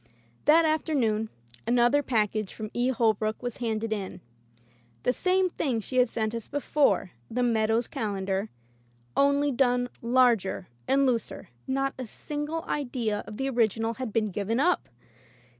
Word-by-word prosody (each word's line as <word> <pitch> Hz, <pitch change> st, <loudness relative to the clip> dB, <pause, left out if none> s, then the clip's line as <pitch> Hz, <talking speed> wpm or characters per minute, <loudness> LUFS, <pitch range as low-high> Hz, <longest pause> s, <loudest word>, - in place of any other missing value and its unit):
That 320 Hz, +3 st, +6 dB
afternoon 260 Hz, -9 st, +1 dB, 0.4 s
another 240 Hz, +4 st, +4 dB
package 215 Hz, -5 st, 0 dB
from 215 Hz, -1 st, -6 dB
E. 245 Hz, +1 st, +1 dB
Holbrook 220 Hz, -2 st, +1 dB
was 245 Hz, -2 st, -3 dB
handed 225 Hz, -2 st, -1 dB
in. 195 Hz, -3 st, -5 dB, 0.8 s
The 250 Hz, -, +2 dB
same 370 Hz, +3 st, +2 dB
thing 260 Hz, -9 st, -1 dB
she 255 Hz, +4 st, -4 dB
had 250 Hz, -1 st, +5 dB
sent 220 Hz, -1 st, -2 dB
us 230 Hz, -2 st, -4 dB
before, 290 Hz, -9 st, +1 dB, 0.2 s
"The 250 Hz, +2 st, 0 dB
Meadow's 225 Hz, 0 st, +2 dB
Calendar,'* 195 Hz, -1 st, -2 dB, 0.7 s
only 280 Hz, +1 st, +3 dB
done 245 Hz, -1 st, +2 dB
larger 235 Hz, -6 st, +2 dB, 0.2 s
and 275 Hz, 0 st, +4 dB
looser. 240 Hz, -4 st, -2 dB, 0.2 s
Not 270 Hz, +1 st, 0 dB
a. 255 Hz, -, -4 dB
single 295 Hz, +7 st, -4 dB
idea 245 Hz, -7 st, -2 dB
of 210 Hz, -, -8 dB
the 270 Hz, -, -1 dB
original 225 Hz, -2 st, +1 dB
had 255 Hz, -1 st, -5 dB
been 215 Hz, -1 st, 0 dB
given 210 Hz, +5 st, -1 dB
up! 350 Hz, +5 st, +2 dB
240 Hz, 140 wpm, -27 LUFS, 220-270 Hz, 0.8 s, That